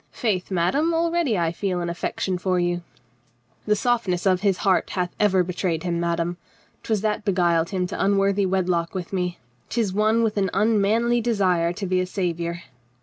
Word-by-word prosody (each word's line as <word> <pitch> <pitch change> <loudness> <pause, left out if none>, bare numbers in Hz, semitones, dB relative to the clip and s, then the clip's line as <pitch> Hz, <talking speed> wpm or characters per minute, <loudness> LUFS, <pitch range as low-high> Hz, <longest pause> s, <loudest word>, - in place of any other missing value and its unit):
Faith, 200 -7 -2
madame, 270 - +1
already 335 - +1
I 165 -2 +1
feel 180 +1 -2
an 175 - -2
affec 170 0 -4
tion 185 -2 0
for 185 0 0
you." 175 0 0 0.9
"The 210 - +4
softness 210 -6 0
of 185 -2 +3
his 195 -3 +2
heart 190 -2 +2
hath 180 -1 -2
ever 190 -3 +3
betrayed 175 -2 -2
him, 170 -2 -1
madame. 170 0 -1 0.4
'Twas 215 -3 -1
that 215 -1 -1
beguiled 175 -4 +2
him 185 -2 -1
to 180 - -3
unworthy 195 0 +2
wedlock 180 -2 0
with 185 0 -5
me. 180 -2 -1 0.3
'Tis 220 -5 -1
one 215 +3 +2
with 215 -2 0
an 195 -2 +1
unmanly 220 +3 +2
desire 185 -7 +1
to 195 - -5
be 185 0 +1
a 185 - -2
savior." 170 -2 -3
190 Hz, 180 wpm, -23 LUFS, 175-210 Hz, 0.9 s, The